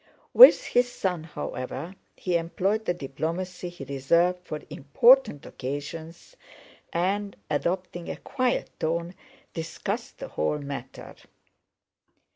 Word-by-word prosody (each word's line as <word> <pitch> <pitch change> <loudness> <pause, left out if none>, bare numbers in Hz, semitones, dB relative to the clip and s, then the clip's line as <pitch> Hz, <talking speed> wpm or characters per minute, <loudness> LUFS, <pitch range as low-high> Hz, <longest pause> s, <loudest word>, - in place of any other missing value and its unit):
With - - +10
his 245 0 +2
son, 180 -8 -2
however, 145 +1 -6 0.2
he 180 -2 -2
employed 190 +6 0
the 175 - +1
diplomacy 175 +5 -4
he 175 -5 -10
reserved 170 +7 +2
for 150 - -5
important 220 - +4
occasions 160 - -7 0.6
and, 195 +4 -1 0.2
adopting 175 +3 -2
a - - -4
quiet 255 -2 -1
tone, 170 +2 -1 0.4
discussed 165 -1 -4
the - - -7
whole 80 - -1
matter. 140 -3 -7
170 Hz, 105 wpm, -26 LUFS, 145-185 Hz, 0.6 s, With